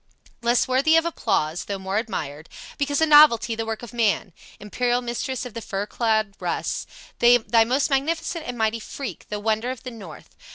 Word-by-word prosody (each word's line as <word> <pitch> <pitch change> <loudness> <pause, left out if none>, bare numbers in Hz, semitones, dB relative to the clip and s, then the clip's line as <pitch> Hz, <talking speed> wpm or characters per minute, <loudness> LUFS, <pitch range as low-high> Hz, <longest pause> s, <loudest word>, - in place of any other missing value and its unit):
"Less 235 +1 +2
worthy 270 +5 +3
of 325 - +2
applause 165 - -1
though 200 - -3
more 190 +2 -2
admired 155 -9 -5 0.3
Because 285 +1 0
a - - +6
novelty, 295 -7 +6
the 225 0 -4
work 225 +1 -4
of 240 - -9
man, 215 -5 0 0.3
Imperial 245 +4 0
mistress 250 +1 -4
of 245 - -8
the 230 - -6
fur 200 -1 -3
clad 220 -2 0
Russ, - - -3 0.3
Thy 240 -1 +5
most 260 +5 0
magnificent 320 +4 -1
and 245 -1 -5
mighty 220 0 0
freak, 265 +3 -7
The 210 - -3
wonder 220 +3 0
of 255 -1 -6
the 255 - -6
north. 195 -9 -12
235 Hz, 180 wpm, -23 LUFS, 215-260 Hz, 0.3 s, a